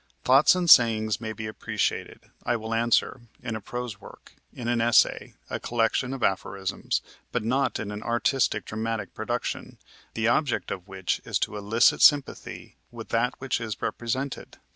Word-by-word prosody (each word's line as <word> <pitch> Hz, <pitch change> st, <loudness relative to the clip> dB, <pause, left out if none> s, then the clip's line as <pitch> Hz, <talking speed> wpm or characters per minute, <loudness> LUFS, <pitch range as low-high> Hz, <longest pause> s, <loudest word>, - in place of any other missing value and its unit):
Thoughts 135 Hz, +7 st, +6 dB
and 180 Hz, -1 st, -1 dB
sayings 110 Hz, -6 st, +5 dB
may 110 Hz, -1 st, -4 dB
be 110 Hz, 0 st, -6 dB
appreciated, 110 Hz, -, -3 dB
I 120 Hz, -, 0 dB
will 110 Hz, 0 st, -4 dB
answer, 120 Hz, +2 st, +1 dB, 0.2 s
in 115 Hz, -2 st, -3 dB
a 110 Hz, -, -5 dB
prose 120 Hz, -1 st, -6 dB
work, -, -, -14 dB, 0.2 s
in 120 Hz, -, -7 dB
an 120 Hz, -1 st, +1 dB
essay, 115 Hz, 0 st, +3 dB
a -, -, -4 dB
collection 120 Hz, +2 st, 0 dB
of 135 Hz, -3 st, -5 dB
aphorisms, 95 Hz, 0 st, -1 dB, 0.3 s
but -, -, -1 dB
not 130 Hz, +5 st, 0 dB
in 105 Hz, -1 st, -4 dB
an 105 Hz, 0 st, -6 dB
artistic 120 Hz, -1 st, 0 dB
dramatic 110 Hz, 0 st, -4 dB
production, -, -, -4 dB, 0.4 s
the 110 Hz, 0 st, 0 dB
object 135 Hz, +2 st, +1 dB
of 90 Hz, -2 st, -6 dB
which 95 Hz, -1 st, -2 dB
is -, -, -1 dB
to -, -, -1 dB
elicit 105 Hz, +3 st, +3 dB
sympathy 145 Hz, -2 st, +2 dB
with 115 Hz, -2 st, -10 dB
that 115 Hz, +2 st, +1 dB
which 130 Hz, -2 st, -2 dB
is 110 Hz, -2 st, -5 dB
represented. 130 Hz, +3 st, -4 dB
115 Hz, 165 wpm, -26 LUFS, 110-125 Hz, 0.4 s, Thoughts